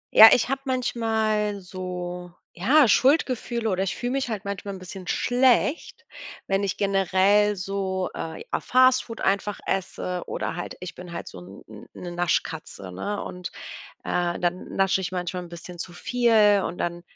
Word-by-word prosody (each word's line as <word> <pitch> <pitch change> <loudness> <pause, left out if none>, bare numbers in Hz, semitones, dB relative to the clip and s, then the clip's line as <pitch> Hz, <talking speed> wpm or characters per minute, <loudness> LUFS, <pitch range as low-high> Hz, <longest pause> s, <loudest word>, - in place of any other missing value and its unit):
Ja, 220 +1 +12
ich 245 - +4
habe 270 0 -1
manchmal 220 -5 0
so, 180 -1 -6 0.2
ja, 260 - +4
Schuldgefühle 250 -2 +2
oder 190 -2 0
ich 195 - -1
fühle 245 0 -3
mich 270 -1 -1
halt 210 -4 -4
manchmal 200 0 -4
'n - - -8
bisschen 185 0 -9
schlecht, 250 +6 +1 0.4
wenn 195 0 +1
ich 200 -1 -2
generell 200 +1 +3
so, 190 -1 -2
äh, 160 - -6
ja - - +1
Fast 255 0 +4
Food 230 -1 -8
einfach 200 +1 0
esse 180 -1 -2
oder - - -3
halt 175 - -5
ich 180 0 -6
bin 180 -1 -10
halt - - -6
so - - -9
'n 95 +3 -12
'n 105 -1 -12
'ne, 175 - -7
Naschkatze, 160 - -2
ne? 205 - -4
Und, 180 0 -6 0.5
äh, 175 -1 -1
dann 180 +1 -2
nasche 195 0 +2
ich 185 - -4
manchmal 180 0 -3
'n 175 - -10
bisschen 175 +1 -10
zu 175 +1 -6
viel 215 -1 +3
und 175 - -4
dann 175 0 -3
195 Hz, 170 wpm, -25 LUFS, 180-220 Hz, 0.5 s, Ja